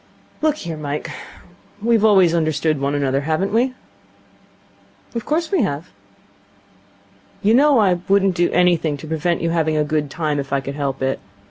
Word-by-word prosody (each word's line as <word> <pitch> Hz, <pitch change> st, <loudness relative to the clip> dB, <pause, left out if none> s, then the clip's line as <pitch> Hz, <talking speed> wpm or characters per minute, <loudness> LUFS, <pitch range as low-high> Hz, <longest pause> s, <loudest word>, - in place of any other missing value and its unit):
'Look 310 Hz, -1 st, +2 dB
here, 170 Hz, -, -6 dB
Mike, 150 Hz, 0 st, -4 dB, 0.7 s
we've 225 Hz, 0 st, +2 dB
always 190 Hz, -6 st, +5 dB
understood 155 Hz, -2 st, 0 dB
one 140 Hz, +1 st, 0 dB
another, 135 Hz, -1 st, 0 dB
haven't 160 Hz, +7 st, -1 dB
we?' 255 Hz, +3 st, +1 dB, 1.4 s
'Of 230 Hz, -2 st, -4 dB
course 320 Hz, +2 st, -1 dB
we 380 Hz, -6 st, +2 dB
have.' 165 Hz, -4 st, -3 dB, 1.5 s
'You 210 Hz, +2 st, +4 dB
know 280 Hz, +2 st, +5 dB
I 190 Hz, -5 st, +3 dB
wouldn't 195 Hz, -1 st, +3 dB
do 175 Hz, 0 st, +1 dB
anything 170 Hz, -4 st, +2 dB
to 140 Hz, -, -10 dB
prevent 160 Hz, +2 st, -1 dB
you 165 Hz, -, 0 dB
having 160 Hz, -2 st, +1 dB
a 150 Hz, -, +2 dB
good 150 Hz, -1 st, -1 dB
time, 150 Hz, -1 st, -2 dB
if 140 Hz, -1 st, -5 dB
I 140 Hz, -, +2 dB
could 135 Hz, +1 st, -6 dB
help 140 Hz, -2 st, -3 dB
it. 135 Hz, 0 st, -1 dB
165 Hz, 165 wpm, -20 LUFS, 145-200 Hz, 1.5 s, always